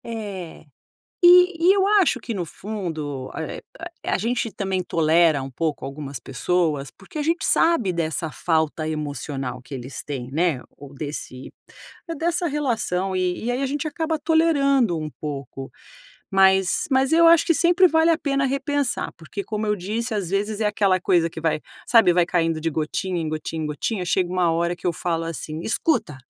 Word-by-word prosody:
É. 200 -8 -7 0.6
E 355 -1 +6
e - - +8
eu 390 -1 +3
acho 405 -3 +3
que, 235 - -5
no 185 -3 -2
fundo, 160 -9 -5
eh, - - -5 0.2
a - - -7
a - - +4
a - - 0
gente 235 +1 -1
também 190 -1 -2
tolera 160 -3 +3
um 135 - -6
pouco 155 +2 -3
algumas 140 -1 -6
pessoas 145 0 -1
porque 195 +10 -11
a - - 0
gente 330 +3 0
sabe 285 - +3
dessa 160 -2 -2
falta 160 -1 -1
emocional 140 -4 -4
que 135 - -9
eles 130 0 -7
têm, 130 -4 -5
né, 155 -2 0
ou 145 0 -12
desse 140 -3 -7 0.6
é, 330 - -3
dessa 340 +3 -1
relação 225 - -1
e 185 +2 -1
e - - +1
aí 250 +2 -1
a - - +1
gente 285 +3 -3
acaba 320 +1 -2
tolerando 280 - +2
um 155 -1 -4
pouco. 135 -3 -6 0.6
Mas 190 -1 +3
mas 265 +2 +2
eu 335 +1 +6
acho 335 +2 +6
que 335 - +3
sempre 350 +3 +5
vale 320 0 +3
a 325 - +2
pena 275 -3 0
repensar 275 0 -1
porque, 170 +5 -6
como 215 0 -3
eu 210 0 +1
disse, 220 +5 -3
às 195 -5 -2
vezes 205 +2 -1
é 215 - +2
aquela 200 -3 +2
coisa 175 -2 +2
que 160 - -8
vai 160 -1 0 0.3
sabe, 225 -7 +6
vai 175 -1 +4
caindo 165 -2 0
de 165 +1 -1
gotinha 170 +4 -2
em 160 - -2
gotinha 155 +1 -4
em - - -2
gotinha, 180 +6 -2
chega 175 0 +1
uma 180 -2 +2
hora 170 +1 0
que 175 - -7
eu 175 - +2
falo 165 0 -2
assim: 160 -1 -5
"Escuta! 225 - 0
185 Hz, 185 wpm, -23 LUFS, -, 0.6 s, e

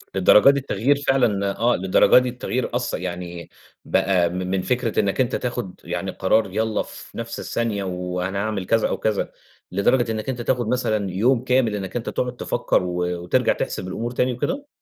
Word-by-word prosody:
للدرجة 95 +6 +6
دي 140 0 +3
التغيير 130 +1 +1
فعلًا 105 -7 +2
آه، 120 +1 +3
للدرجة 95 +5 +4
دي 125 0 -1
التغيير 125 0 -3
أثَّ 125 0 -1
يعني 90 -1 -5 0.4
بقى 90 -3 +2
م - - -7
من 95 +1 -1
فكرة 125 +2 0
إنك 100 +4 +1
أنت 125 - 0
تاخد 120 -7 -4
يعني 90 +2 -3
قرار 95 +2 +1
يالَّا 110 +2 0
في - - -11
نفس 115 0 -5
الثانية 110 -4 -2
وأنا 90 +1 -3
أعمل 105 -4 -2
كذا 115 +3 +2
أو - - -1
كذا، 110 -2 -1 0.4
لدرجة 115 +5 +2
إنك 110 +3 -3
أنت 125 -2 -3
تاخد 120 -1 0
مثلًا 110 -5 0
يوم 115 +7 +2
كامل 125 -4 +2
إنك 95 0 -5
أنت 120 - -2
تقعد 125 0 -2
تفكّر 120 - 0
و 90 -1 -3 0.3
وترجع 90 - +2
تحسب - - -4
الأمور 115 +6 -3
تاني 125 +1 0
وكده؟ 275 - -3
110 Hz, 180 wpm, -22 LUFS, 95-125 Hz, 0.4 s, للدرجة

